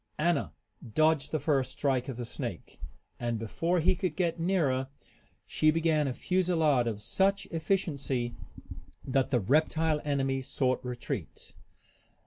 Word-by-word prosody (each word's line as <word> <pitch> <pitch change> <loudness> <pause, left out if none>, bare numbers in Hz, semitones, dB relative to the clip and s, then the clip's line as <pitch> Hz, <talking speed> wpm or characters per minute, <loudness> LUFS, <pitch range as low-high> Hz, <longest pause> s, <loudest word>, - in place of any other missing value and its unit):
Anna 160 -1 +1 0.4
dodged 155 -2 +3
the 155 - +1
first 135 -4 0
strike 135 -3 0
of 125 - -5
the 120 - -4
snake, - - -6 0.4
and 120 -1 -1
before 165 +11 0
he 165 - +3
could 185 -4 -2
get 175 -2 0
nearer 155 -8 +1 0.6
she 155 - +2
began 155 -2 +2
a 130 - -1
fusillade 165 -9 +2
of 110 -3 -2
such 195 - +1
efficiency 140 -8 -1 0.7
that 135 0 +1
the 125 - +2
reptile 155 +6 +2
enemy 135 -2 0
sought 130 -1 0
retreat. 125 -1 -5
150 Hz, 130 wpm, -30 LUFS, 130-165 Hz, 0.7 s, dodged